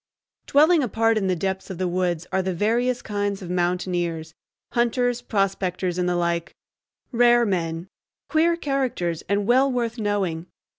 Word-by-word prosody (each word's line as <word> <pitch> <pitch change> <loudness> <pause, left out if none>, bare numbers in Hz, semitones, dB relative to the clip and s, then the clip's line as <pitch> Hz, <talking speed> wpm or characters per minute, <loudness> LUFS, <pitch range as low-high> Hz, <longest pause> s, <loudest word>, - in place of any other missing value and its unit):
Dwelling 310 +3 +5
apart 225 -2 +1
in 205 -3 0
the 185 - +1
depths 190 +2 -3
of 190 - -6
the 185 0 -1
woods 175 -1 -1
are 190 - +1
the 185 -1 -2
various 240 +6 0
kinds 205 -1 -2
of 175 - -6
mountaineers,—hunters, 180 +7 -2
prospectors, 190 -5 -1
and 180 0 +1
the 175 - 0
like,—rare 230 +7 0
men, 170 -3 -2 0.4
"queer 335 +1 +3
characters," 255 - -1
and 200 0 +1
well 260 +4 +4
worth 235 -1 -2
knowing. 190 -6 -1
195 Hz, 140 wpm, -23 LUFS, 175-240 Hz, 0.4 s, Dwelling